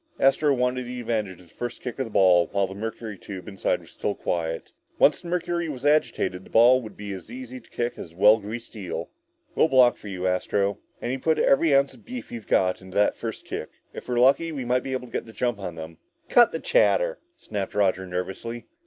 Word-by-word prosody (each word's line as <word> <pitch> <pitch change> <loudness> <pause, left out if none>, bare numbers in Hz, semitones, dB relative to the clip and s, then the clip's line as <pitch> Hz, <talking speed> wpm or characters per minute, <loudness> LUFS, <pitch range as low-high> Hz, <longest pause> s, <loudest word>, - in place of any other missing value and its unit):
Astro 135 +2 +4
wanted 125 0 0
the 125 0 -5
advantage 105 -6 -2
of 90 - -18
the - - -22
first 120 0 -5
kick 125 +1 -5
at 130 - 0
the - - -8
ball 90 -4 +5
while 100 -1 +2
the 95 - -7
mercury 110 -1 -6
tube 95 -1 -8
inside 95 -2 -1
was - - -16
still - - -2
quiet. 80 -1 -3 0.3
Once - - +4
the - - -10
mercury 170 -1 -1
was 135 -2 -6
agitated, 120 -11 +1
the - - -16
ball 125 +3 +6
would 110 -3 -10
be 100 -1 -5
as 95 +1 -9
easy 130 +1 -8
to 115 - -22
kick 120 0 -3
as 80 - -8
a - - -21
well 105 +3 +6
greased 115 +3 -7
eel. 95 -6 -5 0.4
"We'll - - +4
block 130 -4 +5
for - - -11
you, 95 -2 -4
Astro," 95 +2 +1
said - - -22
Tom, - - -34 0.2
"and 120 - -1
you 130 - -2
put 160 +3 +2
every 140 +1 +4
ounce 140 0 +3
of - - -18
beef 250 0 -8
you've 115 -3 -7
got 90 0 +2
into 95 0 -12
that 105 - +3
first 115 -2 -6
kick. - - -5 0.2
If - - -9
we're 120 - 0
lucky, 140 +6 +4
we 135 -5 -4
might 125 +1 +2
be 130 - -4
able 130 -1 -3
to 120 - -16
get - - -3
the 110 - -12
jump 120 0 -1
on 90 -4 -5
them!" 80 0 -9 0.3
"Cut 240 -1 +6
the - - -3
chatter," - - +2 0.2
snapped 100 -2 -5
Roger 95 -2 +1
nervously. 95 +6 -5
115 Hz, 240 wpm, -25 LUFS, 95-130 Hz, 0.4 s, ball